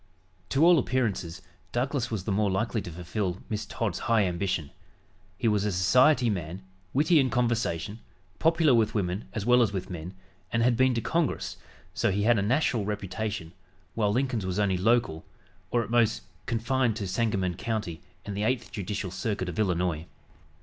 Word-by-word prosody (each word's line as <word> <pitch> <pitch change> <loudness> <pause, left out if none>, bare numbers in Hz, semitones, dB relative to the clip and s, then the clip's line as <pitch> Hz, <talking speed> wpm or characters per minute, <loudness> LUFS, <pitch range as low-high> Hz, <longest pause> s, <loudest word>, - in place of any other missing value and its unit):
To 140 +4 +4
all 175 -2 +7
appearances 100 -9 -1 0.3
Douglas 130 +1 -1
was 110 -5 -3
the 105 - -2
more 100 +1 +2
likely 105 +4 0
to - - -7
fulfill 90 +2 -3
Miss 105 -1 -3
Todd's 110 +1 -2
high 110 -3 +4
ambition. 90 -4 -2 0.7
He 115 - 0
was 105 -2 +2
a 105 - 0
society 125 - +4
man, 90 -3 -3 0.3
witty 155 +4 +4
in 130 -2 +3
conversation, 115 -5 -1 0.4
popular 165 -3 +4
with 115 -2 +2
women 95 0 -1
as 110 -5 -3
well 125 +1 +5
as 110 - +3
with 95 -2 -4
men, 90 +2 -6 0.4
and 115 0 +2
had 120 0 +4
been 130 +1 +3
to 115 - 0
Congress, 160 +5 -1 0.4
so - - +1
he 100 +2 0
had 115 0 +4
a - - +1
national 120 +1 +1
reputation, 100 -3 -4 0.4
while 105 -3 +1
Lincoln's 125 -2 0
was 95 0 -2
only 100 -2 +2
local, 95 -4 +1 0.5
or 120 +2 +1
at 105 - -8
most 110 - +2 0.2
confined 115 0 +1
to 105 -3 -3
Sangamon 95 -2 0
County 105 -3 -3 0.2
and 100 - -5
the 100 - -2
Eighth 115 +1 -1
Judicial 100 -2 -4
Circuit 95 -1 -2
of 85 - -5
Illinois. 90 -5 0
105 Hz, 175 wpm, -28 LUFS, 95-120 Hz, 0.7 s, all